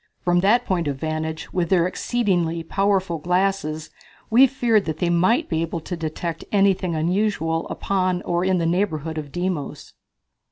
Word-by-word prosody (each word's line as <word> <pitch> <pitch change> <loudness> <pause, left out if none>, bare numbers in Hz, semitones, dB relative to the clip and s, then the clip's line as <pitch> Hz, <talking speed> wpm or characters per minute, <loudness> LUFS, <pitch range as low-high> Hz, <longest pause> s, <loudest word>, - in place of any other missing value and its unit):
From 175 0 +3
that 210 +6 +3
point 175 -4 0
of 140 - -1
vantage, 155 +2 -4
with 175 -2 0
their 175 -3 +3
exceedingly 180 -5 0
powerful 195 -3 0
glasses, 180 -2 -1 0.4
we 255 +4 +7
feared 235 -5 +1
that 155 -1 -3
they 175 0 0
might 185 - +2
be 160 -1 -1
able 165 +1 -3
to 175 - -5
detect 165 0 -4
anything 195 -4 +2
unusual 165 -1 0
upon 185 -2 -1
or 175 0 0
in 185 0 +2
the 170 - 0
neighborhood 165 -3 -1
of 145 -2 -8
Deimos. 175 -3 -4
175 Hz, 160 wpm, -22 LUFS, 160-195 Hz, 0.4 s, we